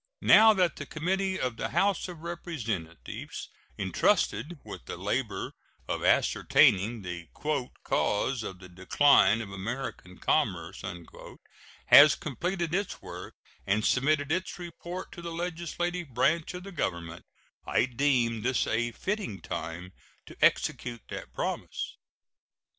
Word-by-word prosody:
Now 220 +1 +8
that 180 -3 +2
the - - -6
committee 190 +4 -1
of 125 -3 -2
the 110 0 -2
House 195 +5 +1
of 175 -3 -9
Representatives 115 - -5 0.3
intrusted 145 +12 +1
with - - -9
the - - -6
labor - - -2 0.3
of - - -2
ascertaining 105 +3 +3
"the 85 -2 -6
cause 135 -4 -1
of 95 -3 -6
the 90 0 -12
decline 95 +4 +4
of 100 -3 -7
American 95 -2 -5
commerce" - - 0 1.0
has 145 0 +9
completed 170 - -3
its 195 +1 -2
work - - -8 0.3
and 105 +2 +2
submitted 145 +2 +2
its 185 +3 -1
report 175 +1 -7
to 170 - -9
the 170 0 -5
legislative 175 -2 -3
branch 165 +7 +2
of 180 - -7
the 200 - -8
Government, 85 - -3 0.4
I - - +3
deem 125 -3 +1
this 130 +3 +1
a 120 +1 0
fitting 195 - -3
time 85 +3 -6 0.3
to - - -12
execute 120 -2 +1
that - - -7
promise. - - -4
135 Hz, 125 wpm, -29 LUFS, 105-175 Hz, 1.0 s, has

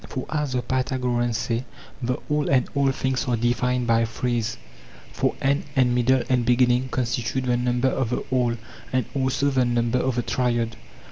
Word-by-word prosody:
Foras 145 +1 -3
the 125 -1 0
Pythagoreans 125 -2 0
say, 115 +1 -1 0.4
the 125 +1 0
all 150 0 0
and 130 -2 +3
all 140 -1 +2
things 130 0 -1
are 120 -1 +1
defined 125 +1 +1
by 115 0 +3
threes; 115 0 -2 0.6
for - - 0
end 140 +1 +1
and 125 -2 +3
middle 125 +1 +3
and 125 -2 +2
beginning 125 +1 +3
constitute 125 +1 -1
the 125 -1 +2
number 125 +1 +1
of 130 -3 -1
the 125 - -1
all, 125 -2 +2 0.4
and 130 -2 +1
also 135 +1 +1
the 130 -1 +3
number 120 0 +1
of 130 -1 0
the 120 - 0
triad. 120 -3 0
125 Hz, 175 wpm, -24 LUFS, 120-130 Hz, 0.6 s, and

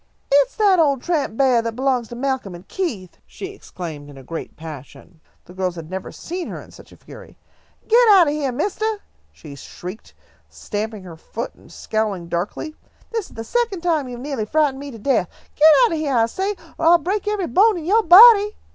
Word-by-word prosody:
"It's 280 0 +3
that 400 -4 +3
old 280 -5 +2
tramp 295 -10 -1
beah 255 -4 +3
that 230 -1 -4
belongs 255 -2 0
to 240 - -9
Malcolm 255 -7 -3
and 175 - -14
Keith," 225 - -5
she 385 - -8
exclaimed, 160 - -9
in 140 - -13
a 135 - -12
great 165 +5 -8
passion. 155 +1 -11 0.2
The 180 - -14
girls 185 -1 -2
had 165 0 -9
never 190 0 -6
seen 355 +1 -6
her - - -7
in - - -14
such - - -16
a - - -16
fury. - - -14 0.5
"Get 470 +1 +5
out 385 -4 +7
of 290 - 0
heah, 290 -3 -2
mistah!" 415 - -2 0.3
she 75 - -12
shrieked, 180 +8 -10 0.3
stamping 215 -1 -5
her 170 -3 -11
foot 230 +8 -7
and - - -20
scowling 205 -6 -3
darkly. 195 - -4 0.4
"This 450 -5 -3
is - - -17
the 225 - -6
second 465 - -1
time 320 -6 0
you 245 -1 -7
have 250 - -9
neahly 245 -8 -4
frightened 295 -3 +1
me 285 0 -7
to 235 - -10
death! 220 -5 0 0.3
Get 310 +1 +6 0.2
out - - -1
of 325 - -2
heah, 285 -4 -1
I 225 -1 +4
say, 385 - -3 0.2
or 325 - +1
I'll 345 +1 +7
break 390 +6 -3
every 415 -3 -1
bone 400 +4 +3
in 320 - -7
yo' 425 +6 +3
body!" 420 +3 +8
275 Hz, 210 wpm, -21 LUFS, -, 0.5 s, body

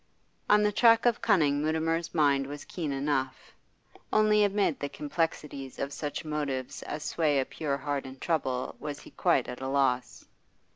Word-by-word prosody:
On 210 0 +6
the 210 - +3
track 230 +2 +5
of 240 -2 +2
cunning 145 -4 +3
Mutimer's 160 +2 0
mind 140 -3 +3
was 145 +1 -7
keen 160 -5 -4
enough; 135 -1 -2 0.6
only 210 0 +4
amid 200 -6 +1
the 145 - -3
complexities 145 -2 -3
of 140 +1 -3
such 145 +2 -4
motives 145 -4 -3
as 150 0 -5
sway 150 -4 +1
a 130 - 0
pure 140 -1 -3
heart 140 -1 -3
in 130 0 -10
trouble 130 -5 -1
was 145 -1 -6
he - - -14
quite 130 - +2
at 125 +1 -7
a 130 - -3
loss. 135 -2 0
145 Hz, 165 wpm, -29 LUFS, 135-165 Hz, 0.6 s, On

